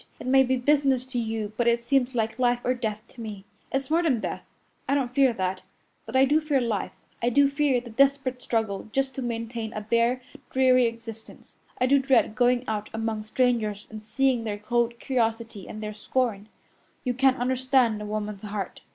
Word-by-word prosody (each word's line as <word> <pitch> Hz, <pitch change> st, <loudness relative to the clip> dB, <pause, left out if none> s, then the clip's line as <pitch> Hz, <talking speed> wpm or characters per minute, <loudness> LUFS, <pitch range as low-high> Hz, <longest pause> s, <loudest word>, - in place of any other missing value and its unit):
It -, -, -8 dB
may 265 Hz, +1 st, +5 dB
be 260 Hz, 0 st, +2 dB
business 270 Hz, -1 st, +2 dB
to 260 Hz, -1 st, -3 dB
you, 220 Hz, -2 st, -3 dB
but 240 Hz, -, +1 dB
it 235 Hz, 0 st, +2 dB
seems 260 Hz, 0 st, +1 dB
like 225 Hz, +1 st, -1 dB
life 245 Hz, -1 st, +3 dB
or 250 Hz, -, +2 dB
death 220 Hz, -4 st, -3 dB
to 240 Hz, -, -12 dB
me. 205 Hz, -3 st, -7 dB, 0.3 s
It's 270 Hz, +1 st, -2 dB
more 330 Hz, +2 st, +4 dB
than 290 Hz, -9 st, +2 dB
death -, -, -4 dB, 0.5 s
I 275 Hz, -, +3 dB
don't 255 Hz, -3 st, -1 dB
fear 270 Hz, -2 st, +4 dB
that 185 Hz, -2 st, -2 dB, 0.5 s
but 225 Hz, -, -6 dB
I 265 Hz, +1 st, +6 dB
do 300 Hz, +3 st, +3 dB
fear 300 Hz, -3 st, +1 dB
life, 230 Hz, -5 st, -2 dB, 0.3 s
I 235 Hz, -, +2 dB
do 280 Hz, +3 st, +5 dB
fear 280 Hz, -2 st, +1 dB
the 240 Hz, -1 st, -11 dB
desperate 270 Hz, +1 st, +2 dB
struggle 220 Hz, -3 st, -2 dB
just 270 Hz, +1 st, 0 dB
to 270 Hz, -, -5 dB
maintain 230 Hz, -1 st, -4 dB
a 215 Hz, -, -4 dB
bare, 235 Hz, +3 st, +1 dB, 0.3 s
dreary 255 Hz, -2 st, +4 dB
existence. 230 Hz, -1 st, -9 dB, 0.2 s
I 255 Hz, -, +3 dB
do 275 Hz, +2 st, +4 dB
dread 265 Hz, -5 st, +3 dB
going 245 Hz, +2 st, +2 dB
out 215 Hz, -1 st, -3 dB
among 220 Hz, -1 st, -2 dB
strangers 215 Hz, -3 st, 0 dB
and 215 Hz, -1 st, -7 dB
seeing 240 Hz, +3 st, +1 dB
their 210 Hz, -2 st, -3 dB
cold 235 Hz, +2 st, 0 dB
curiosity 230 Hz, -5 st, -2 dB
and 215 Hz, 0 st, -7 dB
their 210 Hz, 0 st, -4 dB
scorn. 215 Hz, -1 st, -2 dB, 0.5 s
You 250 Hz, -, 0 dB
can't 265 Hz, +1 st, +3 dB
understand 255 Hz, -3 st, +2 dB
a -, -, -5 dB
woman's 210 Hz, -1 st, -4 dB
heart. 205 Hz, -2 st, -5 dB
240 Hz, 195 wpm, -26 LUFS, 220-260 Hz, 0.5 s, I